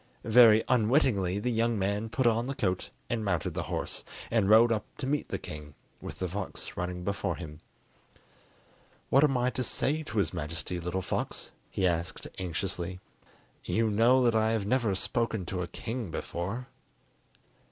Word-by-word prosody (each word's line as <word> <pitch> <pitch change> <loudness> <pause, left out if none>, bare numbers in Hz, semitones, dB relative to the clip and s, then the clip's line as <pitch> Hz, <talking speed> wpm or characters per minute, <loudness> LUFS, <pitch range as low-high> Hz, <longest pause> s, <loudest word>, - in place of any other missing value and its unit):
Very 110 -1 +7
unwillingly 110 - +3
the 125 +5 -1
young 115 0 +1
man 100 +3 -1
put 130 +3 0
on 115 +1 +3
the 135 - -3
coat 90 -5 -1 0.2
and 115 -2 -1
mounted 95 -5 -1
the - - -2
horse, - - -3 0.3
and 110 -4 +2
rode 115 +2 +7
up 110 -2 +1
to - - -4
meet 145 +2 -1
the - - -1
king, 75 -1 -9 0.3
with - - -7
the 95 - -2
fox 95 +2 -6
running 90 0 -3
before 100 +2 -1
him. 75 -3 -8 1.5
"What 135 - +6
am 135 -4 +3
I 125 +1 +1
to 130 - -2
say 150 +5 0
to 120 -7 -6
his 100 - +1
Majesty, 85 +2 -3
little 90 +2 -2
fox?" - - -3 0.2
he 95 - 0
asked 85 -1 -1
anxiously; 90 0 -3 0.6
"you 110 -1 +1
know 120 +5 +5
that 120 -1 +4
I 110 0 +3
have 110 -3 0
never 115 -3 +1
spoken 110 -1 -1
to 90 +1 -3
a 85 - -3
king 115 +2 -5
before." 95 +10 -4
105 Hz, 170 wpm, -29 LUFS, 90-120 Hz, 1.5 s, Very